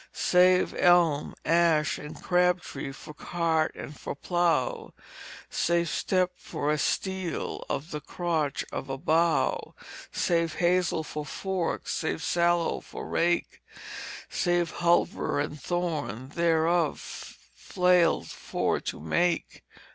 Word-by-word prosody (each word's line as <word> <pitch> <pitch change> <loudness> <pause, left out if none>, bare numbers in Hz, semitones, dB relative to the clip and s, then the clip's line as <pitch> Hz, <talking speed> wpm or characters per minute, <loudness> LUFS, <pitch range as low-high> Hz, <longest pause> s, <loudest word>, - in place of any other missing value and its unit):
"Save 180 0 +4
elm, 175 -5 +3
ash, 165 -2 +3
and 150 +1 -9
crab 180 0 +3
tree 135 -4 -6
for 135 +2 -11
cart 160 -1 0
and 150 - -8
for - - -6
plow, 170 -4 0 0.5
Save 170 -1 +1
step 185 +1 +1
for 145 +1 -2
a 150 - 0
stile 190 +1 -2
of 150 +5 -3
the 150 -1 -4
crotch 160 -5 -2
of - - -5
a 135 - -3
bough; 165 +3 +1 0.4
Save 165 -2 0
hazel 175 -2 +2
for 150 0 -5
forks, 185 +4 -3
save 160 0 -2
sallow 170 0 +2
for - - -8
rake: 175 0 0 0.7
Save 175 -3 0
hulver 170 -4 +1
and 145 +1 -3
thorn, 155 -8 -2
thereof 165 0 +2 0.5
flail 180 -2 +2
for - - -2
to - - -5
make." 170 - 0
170 Hz, 115 wpm, -28 LUFS, 155-175 Hz, 0.7 s, Save